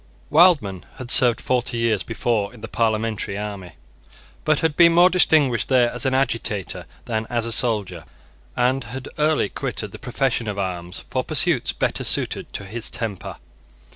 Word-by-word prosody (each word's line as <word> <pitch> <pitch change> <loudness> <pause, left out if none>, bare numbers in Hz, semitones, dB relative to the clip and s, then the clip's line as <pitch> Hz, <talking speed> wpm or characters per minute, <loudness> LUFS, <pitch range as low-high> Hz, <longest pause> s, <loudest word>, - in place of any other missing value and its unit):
Wildman 145 - +4
had 130 -2 -7
served 120 -2 +5
forty 125 -1 -1
years 115 -4 +1
before 115 -3 -1
in 110 - -15
the 115 - -6
parliamentary 110 -3 -1
army, 100 -4 -6 0.7
but 155 -1 +2
had 160 -2 0
been 170 0 +6
more 175 +2 +6
distinguished 150 -9 +3
there 125 -3 +3
as 125 +3 0
an 130 - +1
agitator 115 -7 -2 0.2
than 110 -1 -3
as 120 -1 -1
a 115 - -2
soldier, 105 - +1 0.5
and 125 +1 +1
had 125 +3 -7
early 150 -6 +2
quitted - - -4
the - - -10
profession 125 -2 -1
of 105 -1 -4
arms 90 -2 -5
for 130 - 0
pursuits 155 -3 +1
better - - -2
suited - - -2
to 100 - -6
his 110 +4 -3
temper. 105 -6 -5
120 Hz, 165 wpm, -22 LUFS, 105-135 Hz, 0.7 s, been